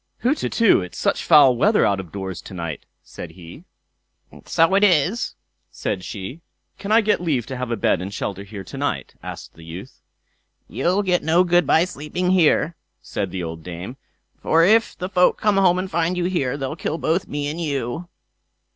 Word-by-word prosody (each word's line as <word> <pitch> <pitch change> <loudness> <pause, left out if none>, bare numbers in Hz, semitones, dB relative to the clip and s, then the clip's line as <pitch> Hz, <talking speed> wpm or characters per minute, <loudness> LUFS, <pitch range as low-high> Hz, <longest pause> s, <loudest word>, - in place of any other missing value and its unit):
"Hutetu! 240 - +3
it's 90 - -8
such - - 0
foul 140 -4 +6
weather 205 - +3
out 100 -1 +1
of 90 -4 -8
doors 95 -2 -5
to 95 - -10
night", 85 -3 -6 0.2
said - - -10
he. 85 -2 -13 0.8
"So 165 +3 +2
it 200 +1 +4
is", 185 +4 +2 0.3
said 90 - -4
she. 105 - -7 0.4
"Can 200 - -5
I 225 +1 +6
get 210 -4 +1
leave 145 -9 0
to 135 - -6
have 125 -1 -4
a 120 - 0
bed 95 - +1
and 95 +2 -5
shelter 100 -1 -4
here 100 -1 -8
to - - -10
night?" - - -2
asked - - -8
the 80 - -15
youth. 80 +3 -10 0.7
"You'll 185 +4 0
get 180 -2 +1
no 165 +3 +3
good 175 -3 +2
by 165 - +4
sleeping 180 +2 -3
here", 170 -2 +3 0.2
said 100 -2 -4
the 90 0 -4
old 80 0 -6
dame; 90 +8 -7 0.4
"for 165 +1 +3
if 225 +4 +3
the 180 - -3
folk 180 -1 +3
come 210 -2 +2
home 180 -2 +4
and 185 +1 -3
find 170 +2 0
you 175 - 0
here, 145 -8 -1
they'll 135 +1 -4
kill 165 -2 -3
both 165 +3 0
me 145 0 -3
and 155 +4 -4
you." 145 +2 -3
155 Hz, 190 wpm, -22 LUFS, -, 0.8 s, foul